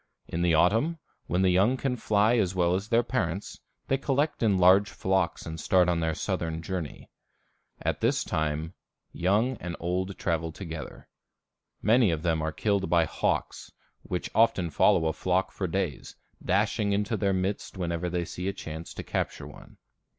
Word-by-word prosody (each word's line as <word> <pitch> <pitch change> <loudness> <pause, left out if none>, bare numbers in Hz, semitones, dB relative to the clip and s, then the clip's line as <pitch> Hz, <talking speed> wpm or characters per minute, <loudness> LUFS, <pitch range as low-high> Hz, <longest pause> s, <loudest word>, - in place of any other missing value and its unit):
In 85 - -3
the 85 -2 +3
autumn, 115 - +3 0.3
when 90 +2 +1
the 95 - +4
young 100 +8 +3
can 130 -1 -1
fly 110 0 +2
as 95 -4 +1
well 90 -1 +2
as 95 +4 -2
their 120 0 +3
parents, 100 -7 -3 0.3
they 135 - +1
collect 140 +2 0
in 105 -4 +3
large 95 +3 +5
flocks 95 -2 -1
and 80 0 -6
start 90 +2 +3
on 85 -1 +1
their 80 -1 0
southern 80 -4 -3
journey. 85 -4 -5 0.7
At - - -1
this - - +2
time 80 +2 -2 0.4
young 110 +8 +1
and 90 -3 -5
old 90 +3 -2
travel 80 -1 -1
together. 80 -6 -8 0.8
Many 115 +1 +5
of 80 -1 -2
them 80 -2 +1
are 80 0 -1
killed 100 +3 0
by 85 -2 +4
hawks, - - -2 0.3
which 90 - -4
often 110 -7 +3
follow 80 - +4
a 80 - +1
flock 95 +1 0
for 95 - -3
days, 90 -4 -3 0.3
dashing 100 0 +1
into 105 +2 0
their 100 -2 +1
midst 95 +1 -2
whenever 85 -1 -2
they 85 0 -1
see 90 +2 -5
a 100 - -1
chance 80 -1 -8
to - - -5
capture - - -3
one. - - -13
90 Hz, 170 wpm, -28 LUFS, 85-105 Hz, 0.8 s, large